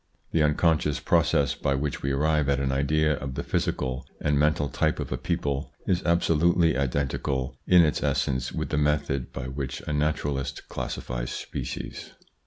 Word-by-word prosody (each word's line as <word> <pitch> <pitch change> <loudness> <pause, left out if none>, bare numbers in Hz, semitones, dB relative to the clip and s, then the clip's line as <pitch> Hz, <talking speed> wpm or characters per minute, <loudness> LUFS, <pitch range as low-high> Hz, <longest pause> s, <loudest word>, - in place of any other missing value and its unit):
The 80 - +2
unconscious 75 -1 +2
pro - - +3
cess 70 - +1
by 70 - 0
which 70 +1 -2
we 70 - -1
arrive 75 +1 +2
at 70 0 +2
an 70 -1 0
idea 75 +3 +2
of 65 -1 -5
the 70 - -3
physical 65 0 -1 0.2
and 75 - +1
mental 75 -1 +2
type 65 - 0
of - - -4
a - - -1
people 70 -1 -2
is 90 -1 +1
absolutely 85 -1 +3
identical 65 0 -1
in 90 -1 +7
its 75 - +1
essence 65 -2 0
with - - -3
the 75 - 0
method 75 -3 0
by 60 - -5
which 65 0 -4
a 75 - -4
naturalist 75 -2 -1
classifies - - -4
species. - - -6
70 Hz, 170 wpm, -26 LUFS, 70-75 Hz, 0.2 s, in